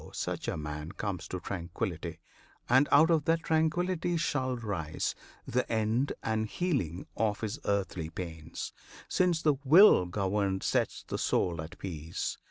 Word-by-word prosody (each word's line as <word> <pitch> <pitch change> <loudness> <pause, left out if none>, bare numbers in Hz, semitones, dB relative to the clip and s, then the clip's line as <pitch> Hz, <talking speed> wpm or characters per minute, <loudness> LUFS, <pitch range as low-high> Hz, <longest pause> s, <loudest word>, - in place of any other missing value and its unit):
such - - -3
a - - -1
man 75 +1 -5
comes 95 -4 -4
to 90 - -4
tranquillity; 85 -1 -4 0.5
And 130 +4 +5
out 155 +4 +6
of 155 -3 +3
that 165 0 +2
tranquillity 170 +2 +1
shall 130 -5 0
rise 95 -9 -2 0.3
The 125 +2 -1
end 115 +5 +1
and 110 0 0
healing 105 - -1
of 105 -1 0
his 110 -2 -3
earthly 95 -5 -1
pains, 80 -2 -6 0.3
Since 175 -3 +2
the 150 -3 +3
will 155 - +7
governed 95 +1 0
sets - - 0
the - - -3
soul 85 -3 +1
at 85 +4 -9
peace. 80 -3 -4
105 Hz, 145 wpm, -30 LUFS, -, 0.5 s, will